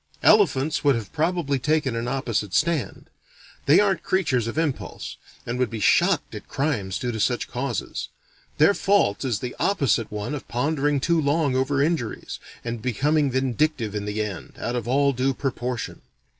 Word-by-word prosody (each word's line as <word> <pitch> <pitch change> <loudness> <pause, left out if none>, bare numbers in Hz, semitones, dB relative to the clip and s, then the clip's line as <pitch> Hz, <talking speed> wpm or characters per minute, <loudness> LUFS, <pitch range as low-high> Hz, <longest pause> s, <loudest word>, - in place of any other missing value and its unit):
Elephants 145 +4 +4
would 140 -3 +4
have 110 -4 -5
probably 160 -3 0
taken 150 -2 +1
an 115 +1 -2
opposite 120 -6 -1
stand. 150 -10 0 0.6
They 145 - +7
aren't 200 -2 +2
creatures 135 - +1
of 115 - -4
impulse, 160 -5 -3 0.3
and 120 +1 -3
would 125 -3 +1
be 115 - -5
shocked - - +3
at - - -8
crimes 115 -10 -1
due 125 - -2
to 110 - -4
such 120 +4 0
causes; 125 -3 -3 0.5
their 160 +7 +6
fault 195 - +2
is 120 -6 -1
the 125 -1 -5
opposite 140 - +1
one 105 +6 -4
of 145 - -6
pondering 145 +3 0
too 165 +3 +2
long 145 -2 +1
over 135 +2 +1
injuries, 150 -8 -2 0.3
and 115 -1 -4
becoming 145 +5 +1
vindictive 130 -2 0
in 105 -1 -3
the 105 +1 -1
end, 100 -5 -7
out 120 +2 -3
of 120 -2 -3
all 140 +2 +3
due 130 +1 0
proportion. 125 -2 -3
130 Hz, 170 wpm, -24 LUFS, 115-150 Hz, 0.6 s, They